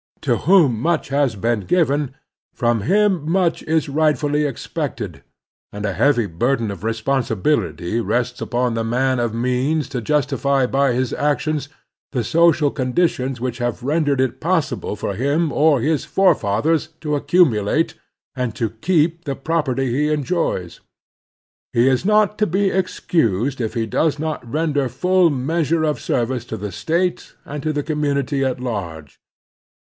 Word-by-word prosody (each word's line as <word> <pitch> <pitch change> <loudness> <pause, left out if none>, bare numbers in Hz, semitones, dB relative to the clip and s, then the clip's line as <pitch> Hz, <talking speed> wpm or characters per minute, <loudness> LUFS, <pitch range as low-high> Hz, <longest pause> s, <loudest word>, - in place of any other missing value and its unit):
To - - +1
whom 160 - +4
much 170 +2 0
has 140 -4 +1
been 115 +3 0
given, 145 - 0 0.4
from 120 -3 +1
him 190 - +2
much 180 -3 +1
is 160 -1 0
rightftilly 150 0 +1
expected, 130 - -5 0.5
and 105 +1 -5
a 100 - -1
heavy 120 +3 +2
burden 115 +5 -1
of 100 -1 -9
responsibility 115 -3 -1
rests 120 +1 -1
upon 125 0 0
the 115 0 -1
man 130 +3 +1
of 120 -2 0
means 125 +6 0
to 130 -4 -3
justify 140 0 +1
by 135 0 +1
his 125 0 -1
actions 150 0 -1 0.4
the 125 -4 0
social 155 +3 +3
con 130 -3 -3
ditions 135 -7 0
which 125 0 -3
have 120 0 -2
rendered 145 -1 +1
it 130 -2 0
possible 165 - -1
for 100 - -3
him 140 - 0
or 145 -4 +3
his 155 +2 +1
forefathers 160 - +2
to 150 -2 -1
accumulate 145 - +2 0.4
and 125 -4 -2
to 115 -3 -2
keep 165 +6 0
the 140 -2 -2
property 135 -4 -1
he 145 +5 +1
enjojrs. 150 - -1 0.9
He 120 +2 +4
is 130 +1 +2
not 210 +1 +2
to 210 - +3
be 195 +3 +1
excused 135 - 0
if 110 0 -3
he 115 -1 0
does 150 +6 0
not 150 -6 -4
render 145 -4 0
full 180 +7 +3
measure 155 +3 0
of 150 -1 0
service 120 0 -1
to 110 - -5
the 105 -1 -5
State 165 - -2
and 145 0 -6
to 155 - -1
the 145 -1 -2
commtmity 140 -2 -1
at 130 -2 -1
large. 85 - -5
140 Hz, 155 wpm, -20 LUFS, 120-155 Hz, 0.9 s, whom